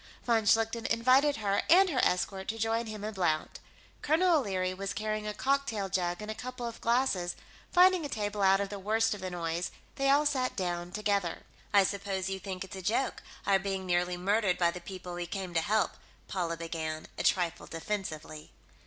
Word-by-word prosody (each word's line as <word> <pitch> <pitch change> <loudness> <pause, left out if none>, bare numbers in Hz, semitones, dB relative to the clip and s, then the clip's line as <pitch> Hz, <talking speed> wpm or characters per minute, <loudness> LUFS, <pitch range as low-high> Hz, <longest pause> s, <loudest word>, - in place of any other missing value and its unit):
Von 230 -3 +2
Schlichten 225 +2 +2
invited 255 +5 +4
her 200 -2 0
and 370 +2 +7
her 260 - +1
escort 190 +1 0
to 225 - -2
join 225 +1 0
him 215 -1 -6
and 215 +1 -3
Blount. 160 -5 -1 0.4
Colonel 325 +2 +4
O'Leary 185 -6 -1
was 195 +1 -4
carrying 215 0 -2
a 210 - -2
cocktail 270 -8 0
jug 175 +1 -1
and 215 - -4
a - - -2
couple 250 +2 -6
of 230 -1 -6
glasses; 230 -7 +1 0.4
finding 365 -1 +6
a 290 - -4
table 205 -3 -2
out 195 0 +5
of 200 -1 -2
the 200 0 -6
worst 220 +3 +1
of 205 - -7
the 185 - -3
noise, 170 0 -2 0.3
they 275 0 +2
all 285 +2 +5
sat 265 -3 0
down 175 -2 -2
together. 200 -3 -1 0.3
"I 200 -1 +6
suppose 195 -1 -2
you 190 - -3
think 190 -1 -5
it's 190 - -9
a 190 - -6
joke, 225 +8 0 0.2
our 195 -1 +4
being 195 -1 -3
nearly 180 0 +1
murdered 195 +1 +2
by 170 -1 +3
the 180 - -8
people 185 0 -7
we 175 0 -4
came 185 0 -5
to 165 - +2
help," 215 +4 +1 0.4
Paula 170 -3 -2
began, 160 -1 -4
a - - +1
trifle 175 -2 +1
defensively. 160 -4 -5
200 Hz, 195 wpm, -30 LUFS, 180-225 Hz, 0.4 s, and